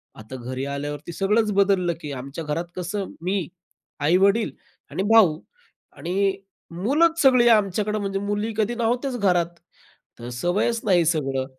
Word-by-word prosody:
आता 110 Hz, +4 st, -10 dB
घरी 130 Hz, +2 st, -5 dB
आल्यावरती 145 Hz, +3 st, -5 dB
सगळंच 210 Hz, +3 st, +1 dB
बदललं, 195 Hz, -3 st, +2 dB
की 150 Hz, -, -6 dB
आमच्या 140 Hz, +4 st, -6 dB
घरात 160 Hz, +3 st, -2 dB
कसं 190 Hz, +2 st, -3 dB, 0.2 s
मी, 185 Hz, -2 st, -1 dB, 0.5 s
आई-वडील 195 Hz, +8 st, +3 dB, 0.4 s
आणि 190 Hz, -, -2 dB
भाऊ 175 Hz, -9 st, +5 dB, 0.6 s
आणि 195 Hz, +3 st, 0 dB, 0.4 s
मुलंच 300 Hz, -, +2 dB
सगळी 255 Hz, -3 st, +5 dB
आमच्याकडे 210 Hz, 0 st, +2 dB
म्हणजे 195 Hz, -1 st, -2 dB
मुली 205 Hz, +2 st, -2 dB
कधी 220 Hz, +2 st, 0 dB
नव्हत्याच 245 Hz, +3 st, -1 dB
घरात. 180 Hz, -5 st, +2 dB, 0.7 s
तर 120 Hz, +1 st, -7 dB
सवयच 190 Hz, -, 0 dB
नाही 175 Hz, -4 st, +3 dB
सगळं. 135 Hz, -5 st, 0 dB
190 Hz, 135 wpm, -23 LUFS, 155-215 Hz, 0.7 s, भाऊ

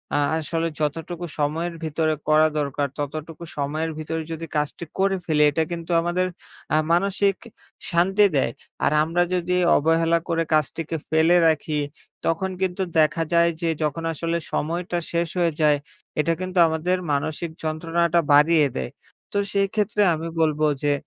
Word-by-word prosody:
আ -, -, +3 dB, 0.2 s
আসলে 165 Hz, +1 st, -1 dB
যতটুকু 165 Hz, +3 st, -3 dB
সময়ের 160 Hz, +4 st, -1 dB
ভিতরে 155 Hz, 0 st, 0 dB
করা 155 Hz, +1 st, +5 dB
দরকার, 140 Hz, 0 st, -1 dB
ততটুকু 155 Hz, +3 st, -5 dB
সময়ের 155 Hz, +3 st, -2 dB
ভিতরে 160 Hz, +1 st, -3 dB
যদি 165 Hz, 0 st, -4 dB
কাজটি 150 Hz, +3 st, -2 dB
করে 195 Hz, 0 st, +2 dB
ফেলি, 150 Hz, -2 st, +3 dB
এটা 160 Hz, +3 st, +1 dB
কিন্তু 170 Hz, 0 st, -5 dB
আমাদের 175 Hz, +2 st, 0 dB, 0.5 s
আ -, -, +5 dB
মানসিক 195 Hz, +2 st, +2 dB, 0.6 s
শান্তি 190 Hz, +4 st, +4 dB
দেয়। 135 Hz, -3 st, +2 dB, 0.3 s
আর -, -, +3 dB
আমরা 170 Hz, +2 st, 0 dB
যদি 180 Hz, 0 st, 0 dB, 0.2 s
অবহেলা 165 Hz, +2 st, +3 dB
করে 165 Hz, 0 st, +1 dB
কাজটিকে 160 Hz, +1 st, 0 dB
ফেলে 160 Hz, +2 st, +4 dB
রাখি, 155 Hz, -1 st, 0 dB, 0.5 s
তখন 165 Hz, +4 st, 0 dB
কিন্তু 190 Hz, 0 st, -1 dB, 0.2 s
দেখা 155 Hz, +1 st, +3 dB
যায় 170 Hz, 0 st, +5 dB
যে, 170 Hz, -, +1 dB
যখন 150 Hz, +2 st, -2 dB
আসলে 165 Hz, +2 st, -2 dB, 0.2 s
সময়টা 170 Hz, +3 st, -1 dB
শেষ 170 Hz, 0 st, 0 dB
হয়ে 170 Hz, -2 st, +2 dB
যায়, 150 Hz, -1 st, +4 dB, 0.4 s
এটা 165 Hz, +2 st, +2 dB
কিন্তু 185 Hz, 0 st, -4 dB
আমাদের 160 Hz, +3 st, 0 dB
মানসিক 155 Hz, +4 st, -1 dB
যন্ত্রণাটা 165 Hz, +2 st, +1 dB
বাড়িয়ে 150 Hz, +1 st, +5 dB
দেয়। 65 Hz, -2 st, -3 dB, 0.4 s
তো 205 Hz, -, -2 dB, 0.2 s
সেইক্ষেত্রে 205 Hz, +1 st, +1 dB
আমি 165 Hz, +1 st, -5 dB
বলবো 155 Hz, -1 st, +2 dB, 0.2 s
যে, 145 Hz, 0 st, +3 dB
165 Hz, 150 wpm, -23 LUFS, 155-175 Hz, 0.6 s, করা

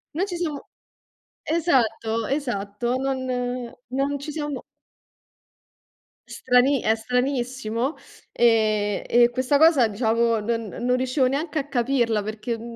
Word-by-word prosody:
Non 345 Hz, +6 st, 0 dB
ci 360 Hz, -, -4 dB
siamo 315 Hz, -5 st, -4 dB, 0.8 s
Esatto, 230 Hz, -9 st, +1 dB
esatto, 240 Hz, -4 st, -2 dB
non 265 Hz, 0 st, -2 dB, 0.6 s
non 275 Hz, +3 st, -1 dB
ci 285 Hz, +2 st, -6 dB
siamo 295 Hz, -2 st, -4 dB, 1.7 s
Strani 260 Hz, +1 st, +2 dB
è 220 Hz, -, +2 dB
stranissimo 250 Hz, +1 st, -2 dB, 0.4 s
e 215 Hz, -3 st, +2 dB
e 240 Hz, 0 st, +5 dB
questa 255 Hz, +3 st, +1 dB
cosa, 305 Hz, -6 st, +5 dB
diciamo, 225 Hz, +1 st, +1 dB
non 230 Hz, +1 st, -2 dB
non 245 Hz, +5 st, -1 dB
riuscivo 255 Hz, +1 st, +1 dB
neanche 295 Hz, +4 st, -2 dB
a 280 Hz, -, -4 dB
capirla 240 Hz, -5 st, +1 dB
perché, 215 Hz, +2 st, -4 dB
uhm, 230 Hz, +1 st, -7 dB
250 Hz, 120 wpm, -24 LUFS, 225-275 Hz, 1.7 s, e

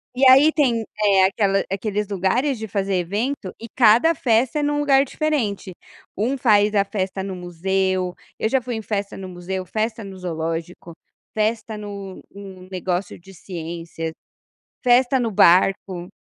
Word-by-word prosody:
E 265 Hz, -, +3 dB
aí 275 Hz, +4 st, +7 dB
tem, 250 Hz, -8 st, +1 dB, 0.2 s
eh, 195 Hz, -2 st, +5 dB
aquela 195 Hz, 0 st, +1 dB
aqueles 205 Hz, +1 st, -2 dB
lugares 215 Hz, +8 st, 0 dB
de 220 Hz, -, -6 dB
fazer 195 Hz, -1 st, -1 dB
evento, 200 Hz, +5 st, -2 dB
e 230 Hz, -, -8 dB
cada 240 Hz, +9 st, +4 dB
festa 245 Hz, +2 st, +1 dB
é -, -, 0 dB
em 290 Hz, -, +1 dB
um 295 Hz, 0 st, 0 dB
lugar 275 Hz, -2 st, +4 dB
diferente, 235 Hz, -, -2 dB, 0.4 s
um 240 Hz, +7 st, 0 dB
faz 210 Hz, -4 st, +3 dB
a 200 Hz, -1 st, +3 dB
festa 195 Hz, -1 st, -3 dB
no 190 Hz, -1 st, -5 dB
museu, 185 Hz, +1 st, -1 dB, 0.2 s
eu 220 Hz, -, 0 dB
já 265 Hz, +1 st, +1 dB
fui 245 Hz, 0 st, -4 dB
em 220 Hz, -, -4 dB
festa 205 Hz, -2 st, -3 dB
no 190 Hz, -1 st, -7 dB
museu, 185 Hz, +1 st, -5 dB
festa 220 Hz, +4 st, -3 dB
no 195 Hz, -1 st, -9 dB
zoológico, 165 Hz, -1 st, -5 dB, 0.4 s
festa 220 Hz, 0 st, -1 dB
no 200 Hz, -2 st, -8 dB
um 190 Hz, -2 st, -11 dB
negócio 185 Hz, 0 st, -3 dB
de 195 Hz, +3 st, -15 dB
ciências, 165 Hz, -2 st, -6 dB, 0.7 s
festa 250 Hz, +1 st, +4 dB
no 230 Hz, -3 st, -1 dB
barco, 185 Hz, 0 st, +3 dB
200 Hz, 160 wpm, -22 LUFS, 185-230 Hz, 0.7 s, aí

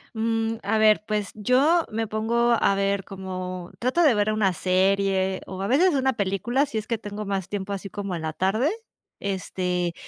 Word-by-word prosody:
Mm, 225 Hz, 0 st, 0 dB
a 210 Hz, +3 st, +1 dB
ver, 215 Hz, -1 st, +5 dB
pués 210 Hz, -2 st, -1 dB
yo 270 Hz, -, +3 dB
me 225 Hz, +1 st, -2 dB
pongo 230 Hz, +3 st, +1 dB
a 200 Hz, -, +3 dB
ver 195 Hz, 0 st, 0 dB
como 185 Hz, -2 st, -6 dB
trato 260 Hz, +8 st, +2 dB
de 290 Hz, -, +6 dB
ver 210 Hz, 0 st, +1 dB
una 210 Hz, -3 st, +2 dB
serie, 190 Hz, +1 st, +1 dB
o 190 Hz, 0 st, -6 dB
a 195 Hz, -, -1 dB
veces 320 Hz, -, +4 dB
una 265 Hz, -1 st, +2 dB
pelicula, 220 Hz, +6 st, 0 dB
si 225 Hz, -, -5 dB
es 215 Hz, -, -3 dB
que 230 Hz, -, -1 dB
tengo 210 Hz, 0 st, -6 dB
más 195 Hz, -2 st, -2 dB
tiempo 200 Hz, -1 st, -4 dB
así 195 Hz, 0 st, -4 dB
como 200 Hz, -1 st, -5 dB
en 165 Hz, -2 st, -4 dB
la 160 Hz, 0 st, -3 dB
tarde, 215 Hz, -, +1 dB, 0.5 s
este, 180 Hz, -3 st, -2 dB
205 Hz, 190 wpm, -25 LUFS, 190-225 Hz, 0.5 s, de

